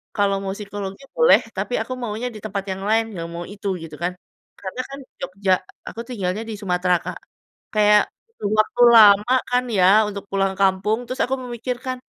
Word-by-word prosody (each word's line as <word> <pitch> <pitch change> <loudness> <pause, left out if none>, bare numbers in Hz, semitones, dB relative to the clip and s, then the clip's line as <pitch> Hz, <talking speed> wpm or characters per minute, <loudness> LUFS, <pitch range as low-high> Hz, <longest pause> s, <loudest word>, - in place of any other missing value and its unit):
kalau 200 -2 +2
mau 195 - -3
psikologi 200 +1 -7
boleh, 485 0 +6 0.2
tapi - - -3
aku 255 - -4
maunya 225 +2 -3
di - - -7
tempat 200 0 -3
yang 190 0 -5
lain, 225 +1 +4
gak 165 -1 -5
mau 170 +1 -5
itu," 205 +1 -7 0.2
gitu 160 -2 -9
kan. 175 - +1 0.5
Karena 200 +6 -4
kan 275 0 -8 0.2
Jogja, 190 +1 0 0.3
aku - - -7
tinggalnya 210 -4 -3
di - - -4
Sumatera 180 -2 +1
Kak, - - -5 0.6
kayak 210 -1 +5 0.2
butuh 455 - -5
waktu 230 +3 +1
lama 210 +1 +7 0.2
kan 250 0 +2
ya 180 - +5 0.3
untuk 200 -1 -7
pulang 195 0 +1
kampung, 195 +3 +2
terus 255 +2 -5
aku 265 - 0
memikirkan, 250 +2 -4
205 Hz, 180 wpm, -22 LUFS, 190-240 Hz, 0.6 s, lama